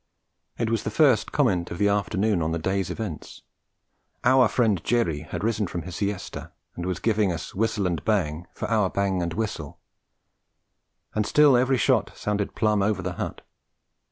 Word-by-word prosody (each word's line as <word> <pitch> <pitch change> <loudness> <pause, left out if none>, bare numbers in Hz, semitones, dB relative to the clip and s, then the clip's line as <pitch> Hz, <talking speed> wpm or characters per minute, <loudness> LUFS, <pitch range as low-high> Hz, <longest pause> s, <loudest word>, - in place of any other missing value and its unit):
It 115 -1 -1
was 115 - +1
the - - -3
first 130 +1 +3
comment 95 -12 +1
of 85 - -6
the 100 +1 +2
afternoon 100 -1 +1
on 80 0 0
the 85 - 0
day's 95 +2 -1
events. 105 -9 -6 0.8
'Our 130 -1 +5
friend 105 -7 +1
Jerry' 90 -11 +1
had - - -4
risen 110 -2 0
from 85 -1 -5
his 90 -2 -7
siesta 100 -1 -4 0.2
and 90 +1 -4
was 90 - -1
giving 105 -4 +1
us 80 -2 -5
whistle 105 -1 0
and 85 -2 -1
bang 90 -6 0
for - - -3
our 105 -4 +2
bang 95 -2 0
and 85 -1 -3
whistle; 100 -9 -4 1.3
and 105 - +1
still 145 +4 +5
every 130 +2 +3
shot - - +1
sounded 105 -1 -2
plumb 105 -2 +2
over 100 -1 0
the 90 0 -3
hut. - - -4
100 Hz, 175 wpm, -25 LUFS, 90-110 Hz, 1.3 s, Our